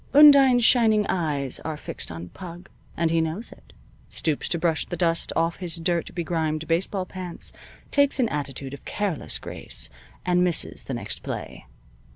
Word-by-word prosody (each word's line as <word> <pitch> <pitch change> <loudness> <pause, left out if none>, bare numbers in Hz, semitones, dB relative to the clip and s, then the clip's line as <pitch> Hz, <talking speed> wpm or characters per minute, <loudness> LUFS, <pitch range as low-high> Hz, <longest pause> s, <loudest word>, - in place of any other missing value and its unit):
Undine's 275 -5 +8
shining 220 -4 +5
eyes 150 -7 0
are 155 -1 -4
fixed - - -4
on 85 +2 -7
"Pug," 175 - -10 0.3
and 165 -1 +1
he 165 0 +3
knows 160 +8 -3
it, - - -16 0.4
stoops 155 -3 -1
to 170 - +1
brush 165 -1 +1
the 175 - -4
dust 165 -1 +1
off 165 +1 +1
his 175 -3 -4
dirt 170 0 -1
begrimed 160 -2 -1
baseball 185 +3 0
pants, 180 -2 -7 0.4
takes 285 0 +3
an 245 - +3
attitude 140 -2 -4
of 140 - -9
careless 200 -7 -3
grace - - -2 0.3
and 180 0 +3
misses 175 -2 +3
the - - -3
next - - -4
play. - - -6
170 Hz, 165 wpm, -25 LUFS, 160-190 Hz, 0.4 s, Undine's